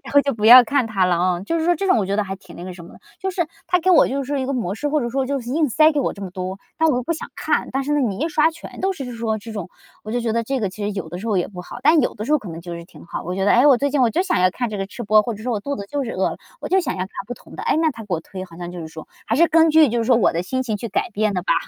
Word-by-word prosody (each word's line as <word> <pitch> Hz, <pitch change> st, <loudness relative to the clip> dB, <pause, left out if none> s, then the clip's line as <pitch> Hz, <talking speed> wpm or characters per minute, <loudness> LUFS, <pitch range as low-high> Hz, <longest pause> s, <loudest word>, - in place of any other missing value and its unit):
然 270 Hz, -, -9 dB
后 285 Hz, -, +8 dB
就 280 Hz, 0 st, -1 dB
不 215 Hz, -2 st, -4 dB
要 245 Hz, +3 st, +11 dB
看 260 Hz, 0 st, +1 dB
它 200 Hz, -4 st, +1 dB
了 180 Hz, -1 st, +2 dB
哦。 180 Hz, 0 st, 0 dB
就 330 Hz, +10 st, -1 dB
是 320 Hz, -, -1 dB
说 350 Hz, +1 st, +3 dB
这 365 Hz, -, -3 dB
种 370 Hz, -, +4 dB
我 200 Hz, -, 0 dB
觉 195 Hz, -, -1 dB
得 210 Hz, -, +2 dB
还 195 Hz, -1 st, -5 dB
挺 200 Hz, -, -15 dB
那 175 Hz, -, -8 dB
个 185 Hz, -, -6 dB
什 175 Hz, -1 st, -11 dB
么 -, -, -14 dB
的。 -, -, -17 dB, 0.2 s
就 385 Hz, -, -2 dB
是 355 Hz, -2 st, 0 dB, 0.2 s
它 360 Hz, -1 st, +2 dB
给 370 Hz, +3 st, +2 dB
我 360 Hz, -, +6 dB
就 275 Hz, +1 st, -2 dB
是 280 Hz, +1 st, -2 dB
一 260 Hz, -, -2 dB
个 275 Hz, -, -1 dB
模 225 Hz, -9 st, -2 dB
式， 290 Hz, +6 st, -2 dB
或 300 Hz, +1 st, +1 dB
者 240 Hz, -, -2 dB
说 265 Hz, +1 st, -1 dB
就 275 Hz, 0 st, -1 dB
是 240 Hz, 0 st, -7 dB
硬 305 Hz, +2 st, +1 dB
塞 310 Hz, +6 st, +5 dB
给 295 Hz, -, -1 dB
我 -, -, -1 dB
这 200 Hz, -, -10 dB
么 190 Hz, -, -5 dB
多， 185 Hz, 0 st, -5 dB, 0.2 s
但 320 Hz, -, +3 dB
我 300 Hz, -, +3 dB
又 250 Hz, -, -1 dB
不 335 Hz, -, -1 dB
想 320 Hz, -, -6 dB
看。 -, -, -1 dB
但 270 Hz, -, 0 dB
是 290 Hz, +2 st, -2 dB
呢， 295 Hz, -, +2 dB
你 215 Hz, -8 st, -1 dB
一 310 Hz, +6 st, 0 dB
刷 310 Hz, 0 st, +3 dB
全 330 Hz, -, -11 dB
都 385 Hz, +1 st, +1 dB
是 270 Hz, -8 st, -6 dB
说 225 Hz, -1 st, -1 dB
这 220 Hz, +2 st, -9 dB
种 205 Hz, -5 st, -5 dB, 0.4 s
我 215 Hz, -, -5 dB
就 245 Hz, -, 0 dB
觉 230 Hz, -2 st, -1 dB
得 230 Hz, +1 st, 0 dB
这 265 Hz, +2 st, -2 dB
个 200 Hz, -4 st, -1 dB
其 205 Hz, +2 st, -6 dB
实 -, -, -1 dB
有 190 Hz, -5 st, -5 dB
的 175 Hz, +2 st, -6 dB
时 210 Hz, -, -7 dB
候 215 Hz, -4 st, +1 dB
也 180 Hz, -, 0 dB
不 180 Hz, -3 st, -9 dB
好。 180 Hz, -, -9 dB
但 315 Hz, 0 st, +5 dB
有 250 Hz, -, -1 dB
的 215 Hz, -, -5 dB
时 -, -, -5 dB
候 305 Hz, -, +5 dB
可 215 Hz, -, -10 dB
能 165 Hz, 0 st, -7 dB
就 175 Hz, 0 st, -8 dB
是 170 Hz, -, -9 dB
挺 -, -, -15 dB
好， 170 Hz, -, -5 dB
我 180 Hz, -, -3 dB
觉 190 Hz, +1 st, -1 dB
得： 200 Hz, -, +3 dB
“诶， 245 Hz, +4 st, +5 dB
我 280 Hz, -3 st, +7 dB
最 280 Hz, +3 st, 0 dB
近 285 Hz, 0 st, +1 dB
我 245 Hz, -, +5 dB
就 345 Hz, -, +1 dB
想 375 Hz, -1 st, 0 dB
要 185 Hz, -, +5 dB
看 240 Hz, +4 st, -3 dB
这 210 Hz, -, -4 dB
个 195 Hz, -, -2 dB
吃 240 Hz, -, -8 dB
播。” 215 Hz, -1 st, +5 dB
或 235 Hz, +1 st, -3 dB
者 210 Hz, -, -10 dB
说： 250 Hz, -, -2 dB
“我 220 Hz, -, 0 dB
肚 280 Hz, +6 st, -3 dB
子 200 Hz, -, -6 dB
就 285 Hz, -1 st, -1 dB
是 235 Hz, -, -4 dB
饿 190 Hz, -, 0 dB
了， -, -, -6 dB, 0.2 s
我 -, -, -5 dB
就 380 Hz, -, +3 dB
想 300 Hz, -9 st, -3 dB
要 -, -, -5 dB
看 185 Hz, -, -3 dB, 0.2 s
不 245 Hz, -, -5 dB
同 -, -, -15 dB
的。” -, -, -6 dB
诶， -, -, +2 dB
那 320 Hz, 0 st, +2 dB
它 230 Hz, -5 st, -9 dB
给 195 Hz, -3 st, -2 dB
我 160 Hz, -, -3 dB
推， 185 Hz, +3 st, -8 dB
好 170 Hz, -3 st, -14 dB
像 175 Hz, 0 st, -6 dB
就 180 Hz, -, -8 dB
是 160 Hz, -, -6 dB
说 160 Hz, 0 st, -10 dB, 0.2 s
还 225 Hz, -, 0 dB
是 335 Hz, +2 st, +5 dB
根 325 Hz, 0 st, +5 dB
据 310 Hz, -1 st, +6 dB
就 240 Hz, +1 st, -1 dB
是 230 Hz, -, 0 dB
说 245 Hz, +1 st, +4 dB
我 225 Hz, -, +3 dB
的 165 Hz, -, -1 dB
心 260 Hz, +8 st, -2 dB
情 220 Hz, -4 st, -2 dB
去 230 Hz, -, -5 dB
改 215 Hz, -, -1 dB
变 215 Hz, -1 st, 0 dB
的 180 Hz, -, -1 dB
吧。 -, -, +2 dB
230 Hz, 420 characters per minute, -21 LUFS, 195-285 Hz, 0.4 s, 要